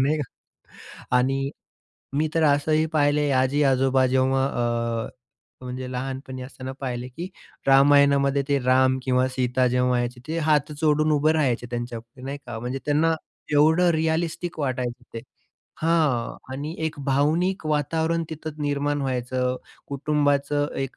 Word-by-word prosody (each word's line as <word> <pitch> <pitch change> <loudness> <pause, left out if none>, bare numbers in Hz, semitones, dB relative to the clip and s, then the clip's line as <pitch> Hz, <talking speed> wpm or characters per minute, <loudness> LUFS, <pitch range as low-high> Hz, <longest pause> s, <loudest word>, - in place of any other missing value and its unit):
नाही 150 +3 +1
का. 130 - -9 0.8
आणि 135 +2 0 0.7
मी 155 +1 +1
तर 165 - +2
असंही 155 +2 +3
पाहिले 145 -1 +2
आजी-आजोबा 130 0 +3
जेव्हा 130 +1 +2
अ, 115 -3 -1 0.6
म्हणजे 125 0 -5
लहानपणी 130 0 -5
असताना 130 0 -7
पाहिले 125 -2 -4
की 165 +9 -7 0.4
रामायणामध्ये 140 0 +5
ते 140 - +2
राम 130 +1 +4
किंवा 130 0 +2
सीता 130 0 0
जेव्हा 125 0 +2
यायचे 120 0 -3
ते 160 +2 -2
हात 150 -2 +1
जोडून 155 0 +3
उभं 150 +1 +3
राहायचे 130 -6 0
त्यांच्यापुढे 120 0 -6
नाही 140 +2 -4
का. 120 -2 -5
म्हणजे 125 +3 -3
त्यांना 155 +3 +2 0.4
एवढं 160 +4 +4
रिअलिस्टिक 160 +2 -1
वाटायचं 125 -3 -2
ते. 115 - -4 0.6
हां. 155 -8 +1 0.2
आणि 145 +4 -5
एक 155 - -4
भावनिक 155 +6 +1
वातावरण 160 +2 0
तिथं 155 -1 -6
निर्माण 145 0 0
व्हायचं. 125 -1 -1 0.3
कुटुंबाचं 145 0 +1 0.2
एक 135 - -9
140 Hz, 130 wpm, -24 LUFS, 130-150 Hz, 0.8 s, रामायणामध्ये